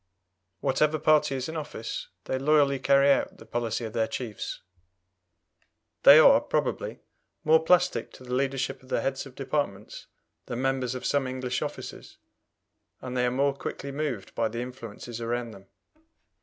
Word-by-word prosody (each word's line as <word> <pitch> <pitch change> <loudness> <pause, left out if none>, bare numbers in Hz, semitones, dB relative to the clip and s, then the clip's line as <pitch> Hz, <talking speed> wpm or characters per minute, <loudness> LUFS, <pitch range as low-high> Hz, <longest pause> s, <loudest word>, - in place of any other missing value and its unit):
Whatever 150 +3 +2
party 155 -2 +3
is 130 -1 -3
in 160 - -6
office, 145 -7 -5 0.2
they 130 - -2
loyally 140 -1 +3
carry 140 +1 +5
out - - +1
the 110 - -13
policy 115 0 -2
of 110 - -7
their 115 -2 +1
chiefs. 115 -5 -5 1.4
They - - +10
are, - - +8
probably, - - -2 0.4
more 160 +1 +5
plastic 180 +2 +2
to - - -13
the 125 0 -6
leadership 135 +1 -1
of 130 - -19
the - - 0
heads 135 0 -2
of 130 - -15
departments 135 -7 -3 0.4
than 120 - -4
members 130 -1 0
of 130 - -6
some 140 -2 +1
English 130 -1 -3
offices, - - -7 0.8
and 130 0 -6
they 125 0 +2
are - - +3
more 140 +3 +1
quickly 140 0 -6
moved 140 -8 -4
by 115 - +1
the 115 +2 -4
influences 120 -2 -8
around 120 0 -2
them. 95 -2 -14
130 Hz, 160 wpm, -27 LUFS, 120-140 Hz, 1.4 s, They